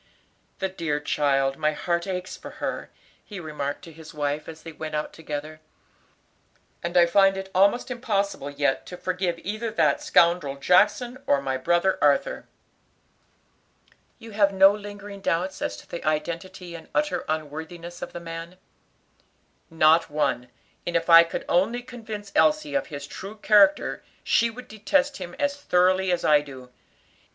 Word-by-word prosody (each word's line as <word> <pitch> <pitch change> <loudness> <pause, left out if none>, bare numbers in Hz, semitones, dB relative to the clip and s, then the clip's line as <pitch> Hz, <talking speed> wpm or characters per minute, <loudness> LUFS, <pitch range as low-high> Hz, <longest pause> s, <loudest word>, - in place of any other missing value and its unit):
"The 190 - -1
dear 165 -6 -2
child; 135 -2 +1
my 155 -1 +1
heart 170 +3 -2
aches 185 -1 -4
for - - -10
her," - - -4 0.3
he 205 -3 -9
remarked 150 -4 -5
to 165 - -11
his 155 -1 -13
wife, 145 +1 -2
as 160 -1 -11
they 165 - -8
went 155 0 -6
out 150 - -3
together, 155 0 -6 1.2
"and 170 +1 -2
I 175 - +7
find 195 +2 +4
it 190 0 -6
almost 200 +7 +3
impossible 200 - -2
yet 145 -2 -1
to 180 - -8
forgive 180 -2 -2
either 215 +4 -3
that 225 +6 +2
scoundrel 170 - +3
Jackson 210 - +2
or 140 - +3
my 135 -1 -2
brother 175 +8 +1
Arthur." 145 -1 +1 1.7
"You 225 - -12
have 200 -1 +3
no 195 0 +7
lingering 205 -1 -9
doubts 185 +1 -1
as 100 - -2
to - - -14
the 170 - -7
identity 170 +4 -3
and 165 -1 -10
utter 300 0 0
unworthiness 160 +3 -5
of - - -6
the - - -7
man?" 165 +1 -8 1.1
"Not 160 0 +4
one; 140 -5 -1 0.4
and 175 - -2
if 170 0 +1
I 165 0 +11
could 165 - -5
only 225 +8 +1
convince 220 -5 -8
Elsie 305 -1 +2
of 280 - 0
his 140 -2 -7
true 195 +7 -8
character 205 -2 +4 0.2
she 235 - +3
would 250 +2 -10
detest 275 +7 0
him 175 -2 -8
as 285 -1 0
thoroughly 185 -7 +2
as 175 - 0
I 150 -1 +5
do. 130 -3 -12
175 Hz, 160 wpm, -25 LUFS, 155-200 Hz, 1.7 s, I